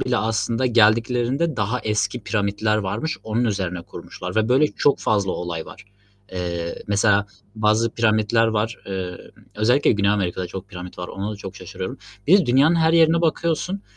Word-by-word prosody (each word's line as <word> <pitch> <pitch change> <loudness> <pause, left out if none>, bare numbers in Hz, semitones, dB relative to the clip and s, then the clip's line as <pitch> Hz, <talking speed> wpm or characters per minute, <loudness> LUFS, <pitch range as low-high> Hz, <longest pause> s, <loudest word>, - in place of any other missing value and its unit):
bile 125 -1 0
aslında 115 +2 0
geldiklerinde 120 +6 +2
daha 110 +4 -1
eski 110 +3 -1
piramitler 105 0 0
varmış, 110 +11 -2
onun 110 +2 -1
üzerine 95 -5 -2
kurmuşlar 90 +2 -8
ve 110 +1 +2
böyle 135 +4 +4
çok 145 -1 +1
fazla 100 -3 0
olay 85 -2 -4
var. 105 - -12 0.5
Eee, 85 -2 -4
mesela 100 0 +2 0.3
bazı 110 +1 +2
piramitler 115 0 +2
var 110 0 -1
emm, 95 -2 -4 0.4
özellikle 120 +7 +3
Güney 100 -1 +2
Amerika'da 95 -3 -1
çok 95 +1 -8
piramit 90 0 -9
var, 90 - -5
ona 100 +3 -4
da - - -7
çok 95 -1 -9
şaşırıyorum. 95 +1 -7 0.3
Bir 190 +6 +7
de 180 - 0
Dünyanın 140 +7 +4
her 160 0 +3
yerine 165 0 +5
bakıyorsun, 170 +4 -1
110 Hz, 165 wpm, -22 LUFS, 95-125 Hz, 0.5 s, Bir